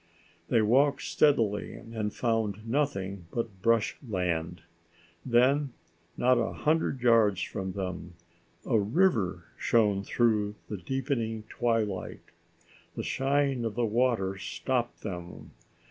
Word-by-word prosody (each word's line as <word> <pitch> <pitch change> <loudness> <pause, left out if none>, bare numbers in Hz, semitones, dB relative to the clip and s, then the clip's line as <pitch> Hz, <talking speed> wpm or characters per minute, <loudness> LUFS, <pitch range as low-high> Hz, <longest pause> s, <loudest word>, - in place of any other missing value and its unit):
They 115 -3 +3
walked 135 +5 +3
steadily 115 -9 +2
and 110 -2 -4
found 110 -2 -1
nothing 100 - -1
but 110 -4 -4
brush 115 +1 +2
land. 90 - -2 0.6
Then, 130 +3 +3 0.4
not 125 0 +4
a - - -1
hundred 155 -4 0
yards 110 -5 +4
from 95 -1 -4
them, 90 -3 -5 0.5
a 115 -4 +3
river 105 - +1 0.2
shone 105 -4 +2
through 105 -2 +1
the 105 - -3
deepening 115 - -2
twilight. 115 -5 -1 0.7
The - - -3
shine 135 -2 +1
of 115 -2 -3
the 120 0 +1
water 110 -4 +1
stopped 120 +6 -2
them. 90 -4 -7
115 Hz, 115 wpm, -29 LUFS, 100-125 Hz, 0.7 s, not